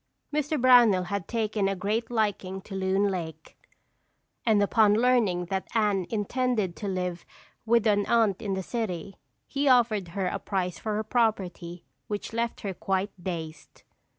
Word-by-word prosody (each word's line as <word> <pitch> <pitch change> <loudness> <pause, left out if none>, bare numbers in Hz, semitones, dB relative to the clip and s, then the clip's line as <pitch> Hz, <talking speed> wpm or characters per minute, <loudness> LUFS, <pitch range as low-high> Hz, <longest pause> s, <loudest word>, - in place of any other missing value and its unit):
Mr. 300 0 0
Brownell 240 -7 +6
had 185 -1 -4
taken 215 -3 0
a 195 - 0
great 215 +5 -2
liking 205 -5 -1
to 195 - -11
Loon 190 +1 +1
Lake 160 -4 -6 0.9
and 210 -2 +4
upon 210 0 +4
learning 220 -7 +2
that 190 +2 -3
Anne 205 -5 +1
intended 220 -3 -1
to 200 - -5
live 180 -2 -3 0.4
with 235 0 +3
an 205 -2 +2
aunt 225 -4 +2
in 200 -4 -2
the 190 - -3
city, 195 -4 -4 0.3
he 280 +1 -1
offered 230 -7 +3
her 185 +3 -3
a 180 - -2
price 180 -3 -2
for 215 -1 -3
her 215 - -1
property 190 -7 -1 0.2
which 210 +1 -5
left 230 0 -2
her 200 -3 -3
quite 195 +2 -1
dazed. 160 -4 -6
205 Hz, 155 wpm, -27 LUFS, 185-225 Hz, 0.9 s, Brownell